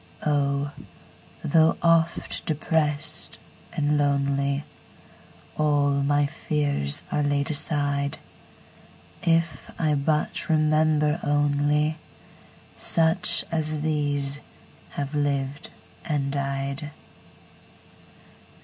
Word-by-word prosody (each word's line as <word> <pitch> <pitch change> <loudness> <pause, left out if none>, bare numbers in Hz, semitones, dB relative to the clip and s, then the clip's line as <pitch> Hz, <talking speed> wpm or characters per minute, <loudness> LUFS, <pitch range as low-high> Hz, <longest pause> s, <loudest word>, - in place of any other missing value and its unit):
Oh, 140 -1 0 0.7
though 160 +2 +3
oft 165 0 +1
depressed 150 -1 0 0.3
and 150 0 0
lonely, 140 0 0 1.0
All 145 -2 +2
my 145 +1 +2
fears 145 - -1
are 150 - +1
laid 145 0 0
aside, 145 -1 -1 1.0
If 165 -1 0
I 155 -2 +2
but 150 +3 0
remember 155 -1 +2
onlySuch 145 +1 +1 1.6
as 155 -2 0
these 145 -2 +1 0.5
have 140 0 -5
lived 140 -1 -2 0.3
and 140 -3 -1
died! 140 +1 -3
145 Hz, 75 wpm, -25 LUFS, 140-155 Hz, 1.6 s, though